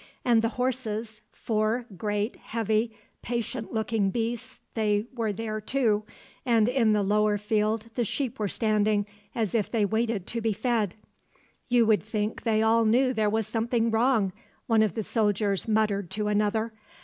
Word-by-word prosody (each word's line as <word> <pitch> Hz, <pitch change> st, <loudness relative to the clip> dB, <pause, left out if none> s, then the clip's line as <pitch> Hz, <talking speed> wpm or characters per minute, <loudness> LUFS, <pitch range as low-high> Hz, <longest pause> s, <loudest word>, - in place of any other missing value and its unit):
And 235 Hz, -2 st, +4 dB
the 230 Hz, -, +1 dB
horses; 225 Hz, -4 st, -2 dB
four 220 Hz, +2 st, -1 dB
great, 210 Hz, +3 st, -2 dB
heavy, 220 Hz, 0 st, -1 dB, 0.3 s
patient 235 Hz, 0 st, -3 dB
looking 220 Hz, -2 st, 0 dB
beasts 240 Hz, +4 st, -3 dB
they 210 Hz, -1 st, +1 dB
were 230 Hz, -4 st, -1 dB
there 215 Hz, +1 st, -4 dB
too, 215 Hz, -3 st, +1 dB, 0.4 s
and 230 Hz, -3 st, +3 dB
in 240 Hz, -4 st, +3 dB
the 210 Hz, -1 st, +2 dB
lower 210 Hz, +1 st, +2 dB
field 215 Hz, +1 st, 0 dB
the 240 Hz, -, 0 dB
sheep 245 Hz, +2 st, -3 dB
were 210 Hz, -, 0 dB
standing, 210 Hz, -1 st, +1 dB, 0.3 s
as 220 Hz, -4 st, -1 dB
if 220 Hz, -4 st, +1 dB
they 220 Hz, -3 st, +1 dB
waited 220 Hz, -2 st, 0 dB
to 230 Hz, -, -3 dB
be 225 Hz, -1 st, +1 dB
fed. 220 Hz, -3 st, 0 dB, 0.7 s
"You 240 Hz, -2 st, +4 dB
would 215 Hz, -1 st, +4 dB
think 215 Hz, 0 st, -3 dB
they 220 Hz, -2 st, +2 dB
all 225 Hz, +1 st, +4 dB
knew 250 Hz, +4 st, +3 dB
there 215 Hz, -3 st, +1 dB
was 220 Hz, +1 st, 0 dB
something 230 Hz, +1 st, 0 dB
wrong," 225 Hz, -4 st, +2 dB, 0.3 s
one 225 Hz, -2 st, +3 dB
of 215 Hz, -5 st, +1 dB
the 220 Hz, -, -1 dB
soldiers 205 Hz, -2 st, 0 dB
muttered 210 Hz, -4 st, +1 dB
to 210 Hz, +2 st, -2 dB
another. 215 Hz, +2 st, +1 dB
220 Hz, 160 wpm, -27 LUFS, 210-230 Hz, 0.7 s, And